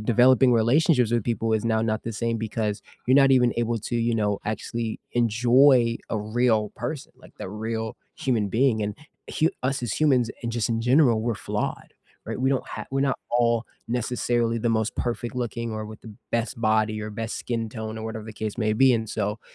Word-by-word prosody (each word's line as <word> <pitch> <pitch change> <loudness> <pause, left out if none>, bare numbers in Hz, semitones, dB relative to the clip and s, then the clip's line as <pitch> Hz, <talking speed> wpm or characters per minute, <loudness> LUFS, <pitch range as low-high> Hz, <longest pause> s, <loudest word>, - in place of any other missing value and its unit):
developing 125 +3 +5
relationships 125 +2 +3
with 120 -3 +1
people 115 -1 -1
is 110 - -1
now 110 -1 +2
not 110 -1 -1
the 115 - -4
same 115 +2 -1
because 110 -2 -3 0.2
you're 130 - +4
not 135 -1 +6
even 125 -2 +4
able 120 -1 0
to, 120 +3 -3
you 115 0 +1
know, 105 -2 0
actually 110 +1 -3
enjoy 120 +1 +4
a 110 - 0
real 110 0 +1
person, 125 +4 -5
like - - -17
the - - -6
real 110 +2 -4 0.2
human 115 -6 0
being. 115 0 +2
And 105 0 -2 0.3
h - - -1 0.2
us 135 0 -1
as 120 - -2
humans, 130 -7 +2
and 115 -1 -3
just 115 -1 -1
in 115 -1 0
general, 125 -2 +4
we're 115 -1 0
flawed. - - -4 0.3
Right? - - -5
We 130 - +2
don't 135 - 0
ha - - -6
we're 135 - +1
not 135 -1 +1
all 120 -1 +2 0.2
necessarily 120 -1 0
the 115 +1 0
most 110 -1 0
perfect 120 0 -3
looking 115 -2 -3
or 110 0 -4
with 110 0 -10
the 110 -2 -11 0.2
best 115 0 -2
body 110 -1 +1
or 105 - -5
best 110 +2 -4
skin 115 -2 -3
tone 110 -1 -6
or 110 - -6
whatever 110 -1 -5
the 110 - -8
case 110 0 -4
may 110 -2 +1
be. 130 +2 +5
And 110 -2 -1
so, 105 0 -2
115 Hz, 205 wpm, -25 LUFS, 110-120 Hz, 0.3 s, not